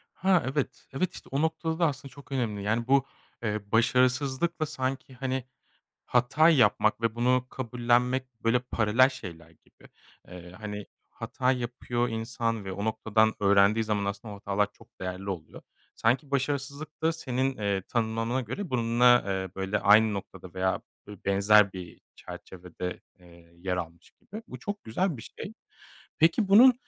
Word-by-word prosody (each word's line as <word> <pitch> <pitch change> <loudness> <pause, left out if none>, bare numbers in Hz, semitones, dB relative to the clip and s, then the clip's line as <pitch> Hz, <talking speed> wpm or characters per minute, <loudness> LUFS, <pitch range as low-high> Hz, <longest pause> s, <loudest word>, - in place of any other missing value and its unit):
Ha, 185 -2 +3
evet, 145 -2 -3
evet, 180 +6 -1
işte, - - -12
o 135 +2 0
noktada 160 +1 -1
da 170 - +4
aslında 140 -1 -5
çok 140 0 -15
önemli. 115 -7 -2
Yani, 115 +3 0
bu, 135 -1 +4 0.4
eee, 105 -2 -3
başarısızlıkla 130 +7 +2
sanki, 130 -1 -4
hani, 130 0 -3 0.6
hata 135 +6 +4
yapmak 125 -7 +3
ve 115 -1 0
bunu 125 +1 +2
kabullenmek 125 0 0
böyle 115 +2 +4
paralel 120 +1 +3
şeyler 85 - -9
gibi. 80 - -22 0.4
Eee, 90 -1 -11
hani, 105 -1 -6 0.2
hata 130 0 -1
yapıyor 120 -1 -2
insan 115 -1 -2
ve 95 - -5
o 100 +2 -4
noktadan 110 0 +2
öğrendiği 100 +2 +4
zaman 105 -2 -1
aslında 100 +2 -5
o - - -9
hatalar 100 0 0
çok - - -22
değerli 95 +2 -4
oluyor. 85 -5 -7 0.3
Sanki 130 +5 +1
başarısızlık 140 +3 -3
da 160 +1 +3
senin, 130 -3 -2
eee, 100 -2 -1
tanımlanmana 115 +1 0
göre 130 - -5
bununla, 120 0 +4
eee, 95 -1 -2
böyle 95 +2 -1
aynı 105 +1 +5
noktada 95 -2 -8
veya 95 0 0 0.3
bö 105 0 -9
benzer 100 +1 +5
bir 90 -3 -9 0.2
çerçevede, 90 0 -8 0.2
eee, 85 -1 -19
yer 90 +1 -2
almış 85 0 -7
gibi. 215 +3 -11
Bu - - -8
çok 205 -1 -6
güzel 155 - -1
bir 115 - -9 0.2
şey. 205 - -6 0.7
Peki 165 +6 +3
bunun, 240 +6 +8
115 Hz, 155 wpm, -28 LUFS, 100-130 Hz, 0.7 s, bunun